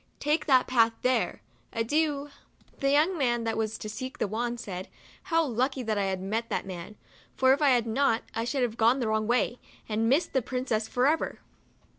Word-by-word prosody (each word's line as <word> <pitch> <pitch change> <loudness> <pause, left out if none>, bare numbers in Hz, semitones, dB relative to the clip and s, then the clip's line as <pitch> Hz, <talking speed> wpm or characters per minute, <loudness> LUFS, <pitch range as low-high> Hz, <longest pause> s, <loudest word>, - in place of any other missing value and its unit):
Take 300 +2 0
that 260 -3 +5
path 230 -3 +3
there. 255 0 0 0.3
Adieu! 290 +4 0 0.2
" - - -31
The 275 - +1
young 310 +5 +3
man 240 -3 +1
that 225 -1 -1
was 220 0 -2
to - - -7
seek 255 +5 -6
the - - 0
wand, 235 +3 -2
said, 185 -5 -6 0.4
"How 330 -3 +2
lucky 260 +1 -1
that 220 -2 -1 0.2
T 185 - -8
met 225 +4 -2
that - - -2
man; 185 +2 -7 0.4
for 260 0 +5
if 285 - -1
I 290 - +5
had 245 -3 +3
not 230 0 +1
I 225 - -2
should 255 +2 -1
have 235 -2 -2
gone 235 +4 +4
the 235 -4 -1
wrong 220 0 0
way, 240 0 +1 0.3
and 225 +1 0
missed 285 +7 +2
the 265 - +2
princess 245 -3 -2
for 250 +1 +1
ever." 315 +3 +1
245 Hz, 205 wpm, -28 LUFS, 225-275 Hz, 0.4 s, that